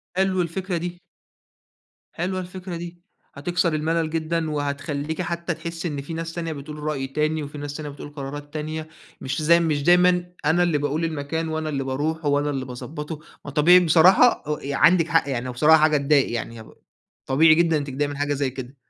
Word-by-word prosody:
حلو 190 -1 +2
الفكرة 180 +1 -3
دي. 175 +1 -5 1.1
حلوة 185 +2 -2
الفكرة 180 0 -7
دي، 175 +1 -8 0.4
هتكسر 170 +3 0
الملل 160 +1 0
جدًا، 160 0 -1
وهتخلّيكِ 145 +2 -3
حتى 170 0 -3
تحسّي 170 +1 -5
إن 145 -3 -4
في 145 +4 -7
ناس 165 0 -4
تانية 165 -2 -3
بتقول 150 +1 -8
رأي 150 -3 -3
تاني 155 +3 -1
وفي 145 +1 -8
ناس 145 0 -5
تانية 150 -1 -5
بتقول 145 +1 -9
قرارات 145 0 -8
تانية 155 +1 -4 0.3
مش 135 +4 -3
زي 170 +2 +5
مش 155 -4 0
دايمًا 180 +1 +4 0.2
أنا 165 +4 +3
اللي 170 -4 +2
باقول 145 +3 -1
المكان 160 +1 -3
وأنا 160 0 -2
اللي 140 -2 -2
باروحه 150 +4 -2
وأنا 145 +1 +1
اللي 135 -2 -3
باضبطه، 150 +5 -7 0.3
ما 145 - -6
طبيعي 165 +5 +6
بصراحة 180 +8 +5
أ 150 0 -2
ي 140 - -3
عندِك 165 +3 +4
حق 165 -4 +2
يعني 125 -2 -2
هو - - -3
بصراحة 155 +6 +5
حاجة 155 -1 +4
تضايق 140 -2 +2
يعني 115 -1 -5
هو 110 - -15 0.5
طبيعي 155 +4 +5
جدًا 165 -1 +3
إنِّك 145 -1 -4
تضايقي 140 +2 -1
من 145 -1 -6
حاجة 145 0 0
زي 140 -1 -1
كده. 130 +1 -8
155 Hz, 195 wpm, -23 LUFS, 145-170 Hz, 1.1 s, طبيعي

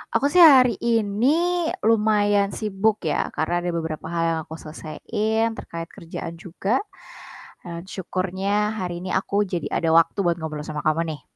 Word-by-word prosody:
Aku 280 - +3
sih 345 +4 +6
hari 255 -7 +7
ini 260 - +1 0.2
lumayan 205 -2 +3
sibuk 215 0 0
ya, 150 - -1
karena 175 +2 -1
ada 175 - -1
beberapa 160 -2 -4
hal 170 -1 0
yang 165 -1 0
aku 160 +1 -10
selesaiin 215 +9 -2
terkait 165 -4 -7
kerjaan 170 -2 -8
juga. 195 - -2 0.8
Dan 170 +1 -8
syukurnya 195 +3 -2
hari 175 -2 -4
ini 185 +1 -6
aku 200 +2 0
jadi 170 -5 -3
ada 165 - 0
waktu 165 +4 +3
buat 175 -3 +2
ngobrol 155 -2 -6
sama 150 -1 -4
kamu 155 +1 +2
nih. 145 - -16
190 Hz, 160 wpm, -23 LUFS, 165-220 Hz, 0.8 s, hari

